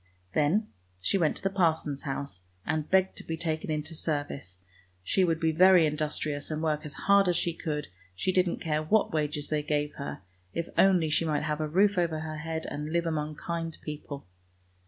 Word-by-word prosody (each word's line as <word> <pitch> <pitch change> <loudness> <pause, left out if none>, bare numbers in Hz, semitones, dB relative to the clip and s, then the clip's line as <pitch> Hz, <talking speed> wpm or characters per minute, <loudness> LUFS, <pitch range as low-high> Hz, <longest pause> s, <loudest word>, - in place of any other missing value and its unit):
Then 160 +9 +3 0.3
she 140 - +1
went 160 -3 +2
to - - -8
the 195 - +1
parson's 160 -6 +1
house, 135 -10 -4 0.2
and 155 -1 -1
begged 190 0 +3
to - - -2
be 160 - -4
taken 160 -1 -2
into 155 +1 -2
service, 145 - -3 0.5
she 190 - +2
would 165 -2 +2
be 160 -1 +2
very 180 +1 +7
industrious 150 -1 -1
and 155 0 -2
work 155 -2 +1
as 140 - -9
hard 200 -1 +6
as 175 - +3
she 170 - 0
could, 150 -3 -3 0.3
she 185 - 0
didn't 180 -1 +2
care 155 -1 0
what 200 +6 +2
wages 150 -1 -1
they 150 -1 +1
gave 150 0 -1
her, 140 -8 -5 0.3
if 170 - -1
only 180 -5 +4
she 160 - +3
might 155 -2 0
have 150 0 -1
a 155 - 0
roof 195 +3 +4
over 165 -3 0
her 155 0 -5
head 160 +1 -4
and 150 +1 -4
live 170 0 +1
among 155 -2 -2
kind 165 0 -4
people. 145 -2 -6
155 Hz, 200 wpm, -29 LUFS, 150-170 Hz, 0.5 s, very